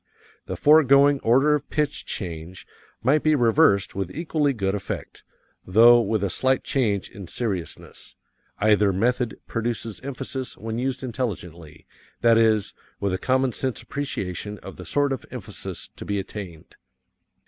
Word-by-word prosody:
The - - -3
foregoing 145 -2 +5
order 135 +6 +4
of 145 -1 -2
pitch 150 -1 -1
change 85 -1 -6 0.4
might 145 +5 +3
be 155 0 +3
reversed 120 -4 +3
with 95 -2 -3
equally 155 - 0
good 100 -6 -1
effect, 100 -2 -5 0.4
though 120 +5 +6
with 110 -1 -1
a 100 - 0
slight 130 +5 +1
change 105 -8 0
in 100 -3 -10
seriousness 95 -6 -5 0.4
either 105 -1 +3
method 120 +4 0
produces 115 -1 -3
emphasis 135 -1 -5
when 110 +2 -4
used 130 +1 -2
intelligently, 90 - -5 0.4
that 115 -1 +5
is, 110 -3 +2 0.3
with 100 -2 -1
a 95 - -1
common 130 +2 +1
sense 130 +2 -3
appreciation 105 -7 -4
of 95 - -9
the 90 - -10
sort 145 - +1
of 130 - -5
emphasis - - -7
to - - -7
be 100 - -2
attained. 95 -4 -8
115 Hz, 145 wpm, -24 LUFS, 100-135 Hz, 0.4 s, though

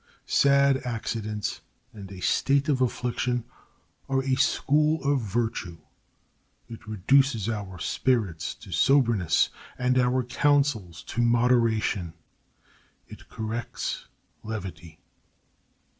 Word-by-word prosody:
Sad 140 -1 +4
accidents 110 -3 -3 0.3
and 100 -3 -10
a 95 -1 -9
state 140 - +2
of 135 -3 +1
affliction 125 -1 -1 0.7
are 135 0 +1
a 135 0 0
school 150 +4 +2
of 140 -1 +2
virtue. 110 -5 -2 0.9
It 115 -2 -11
reduces 110 +2 +2
our 100 -5 -4
spirits 95 -2 -1
to - - -14
soberness 115 - +3 0.3
and 125 0 +2
our 125 +1 +2
counsels 125 - +1
to 120 - -3
moderation; 115 -7 +2 0.9
it - - -13
corrects 110 +2 -4 0.3
levity. 95 -7 -7
120 Hz, 100 wpm, -26 LUFS, 105-135 Hz, 0.9 s, Sad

